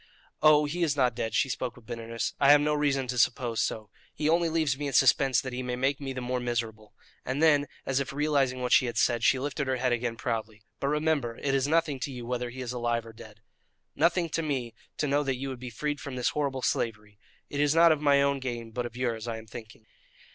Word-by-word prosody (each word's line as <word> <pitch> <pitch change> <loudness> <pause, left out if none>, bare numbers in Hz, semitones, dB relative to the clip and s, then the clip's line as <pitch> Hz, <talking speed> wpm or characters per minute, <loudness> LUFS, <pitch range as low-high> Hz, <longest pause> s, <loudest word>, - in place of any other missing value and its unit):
"Oh, 150 -1 +6
he 165 +5 -3
is 155 -4 +2
not 130 -3 +2
dead!" 110 0 -3
She - - +3
spoke 125 -2 -4
with 120 - -17
bitterness. 115 0 -4
"I 140 0 +6
have 145 - +8
no 150 +1 +1
reason 145 -3 +1
to 125 0 -3
suppose 120 -1 +1
so. 110 -1 -3 0.2
He 150 - -1
only 170 +1 +3
leaves 160 -4 +1
me 145 +1 -4
in 140 - -4
suspense 135 -1 +4
that 130 +1 -5
he 125 - -3
may 125 -1 -3
make 135 +3 0
me 135 -1 -4
the 130 -1 -5
more 125 +1 -2
miserable." 110 -3 -4 0.3
And 130 +3 -3
then, 145 -3 +4 0.2
as 135 0 0
if 140 +1 -3
realizing 140 -3 0
what 125 - -2
she 130 - +5
had 120 -2 -4
said, 120 0 +2
she 130 - +4
lifted 140 +1 -3
her 130 - +1
head 125 0 0
again 120 -1 -1
proudly. 110 -3 -4 0.2
"But 140 - -1
remember 150 -5 0
it 140 - -1
is 135 0 +1
nothing 155 -3 +1
to 140 - -4
you 125 -2 -7
whether 125 0 -3
he 130 +2 -8
is 125 -1 -4
alive 120 -1 -1
or 115 - -11
dead." 110 0 -14 0.5
"Nothing 170 +2 +2
to 165 - -1
me 130 -7 -3 0.2
to - - 0
know 145 +1 +2
that 135 -3 -1
you 135 +2 -4
would 130 -2 -6
be 125 0 -6
freed 145 +5 -3
from 140 -2 -6
this 125 -1 +1
horrible 140 -3 -2
slavery! 105 -2 -2 0.3
It 145 - -3
is 145 +1 +3
not 165 0 +7
of 155 -2 +1
my 140 -1 +4
own 140 0 +1
gain, 120 -3 -5
but 120 +1 -3
of 120 0 -12
yours, 120 -3 -2
I 115 -1 -3
am 110 - -10
thinking." 110 0 -11
130 Hz, 250 wpm, -28 LUFS, 120-145 Hz, 0.5 s, have